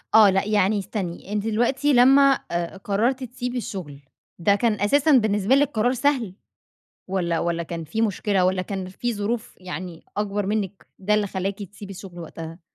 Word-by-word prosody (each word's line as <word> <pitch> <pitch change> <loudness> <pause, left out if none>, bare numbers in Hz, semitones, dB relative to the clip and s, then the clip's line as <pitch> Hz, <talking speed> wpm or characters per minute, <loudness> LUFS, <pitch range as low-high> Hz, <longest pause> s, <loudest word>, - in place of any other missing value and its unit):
آه 215 -2 +9
لأ 195 +1 +1
يعني 205 0 +2
استني، 195 -1 -5
أنتِ 210 -1 0
دلوقتي 250 +6 +2
لمّا 270 +2 +6
آآ 170 +2 -2
قرّرتِ 230 +7 0
تسيبي 250 0 -4
الشغل، 175 - -6 0.4
ده 200 +4 +4
كان 210 -1 0
أساسًا 285 +9 +3
بالنسبة 215 -2 +4
لِك 285 0 +3
قرار 230 +3 +2
سهل، 255 -7 0 0.8
والّا 175 -3 0
والّا 170 0 -1
كان 165 0 -6
في 225 +8 -2
مشكلة، 200 -3 +1
والّا 185 0 +1
كان 190 0 -5
في 235 +5 -3
ظروف 215 +3 -3
يعني 180 -1 -7
أكبر 205 -1 -1
منِّك، 205 -2 -2
ده 205 +2 +1
اللي 210 -1 +2
خلّاكِ 195 +1 -3
تسيبي 200 +1 -10
الشغل 185 -2 -9
وقتها؟ 165 +1 -8
205 Hz, 170 wpm, -24 LUFS, 185-230 Hz, 0.8 s, آه